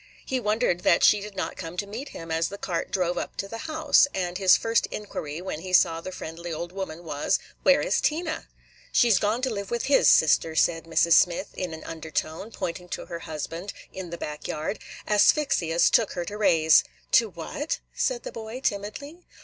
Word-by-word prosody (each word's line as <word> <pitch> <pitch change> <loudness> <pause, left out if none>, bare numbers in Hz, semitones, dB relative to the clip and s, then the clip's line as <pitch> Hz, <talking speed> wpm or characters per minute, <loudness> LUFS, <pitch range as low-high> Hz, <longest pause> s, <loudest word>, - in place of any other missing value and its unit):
He 260 - -1
wondered 215 -5 +1
that 170 - +3
she 210 - +6
did 210 -1 -8
not 185 - -3
come 165 0 -7
to 200 - -1
meet 225 +8 -7
him 165 0 -8
as 165 +1 +1
the 200 - -7
cart 175 -4 -3
drove 180 -2 0
up - - -6
to 195 - -3
the 225 +3 -7
house, 310 -2 +4
and 180 -1 -2
his 190 -2 +6
first 225 0 +1
inquiry, 170 -6 -6
when 185 -5 -4
he 185 +2 -7
saw 165 -3 +4
the 185 - -6
friendly 170 0 -7
old 170 +2 -5
woman, 180 -3 -6
was 150 -3 0 0.2
"Where - - +5
is - - +1
Tina?" 315 +1 -1 0.4
"She 240 -2 +4
's 190 - +5
gone 220 +4 0
to 260 - +1
live 200 -2 -4
with 235 -1 -2
his 280 - +5
sister," 160 +1 +4
said 165 0 +2
Mrs. 165 0 +3
Smith, 175 0 +3
in 180 -2 -4
an 160 - -11
undertone, 160 +3 -4
pointing 180 -4 -5
to - - -5
her 170 - -6
husband 165 +5 -5 0.2
in 190 -2 -6
the 170 - -6
back 150 -2 -6
yard. 155 +7 -3 0.3
"Asphyxia 210 - +3
's - - +5
took 225 -3 +3
her 175 - -3
to 205 - -6
raise." 160 -7 +5 0.3
"To 230 -2 +5
what?" 205 - -4 0.2
said - - -1
the - - -6
boy, 225 +2 -7
timidly. 230 - -3
185 Hz, 205 wpm, -26 LUFS, 165-220 Hz, 0.4 s, she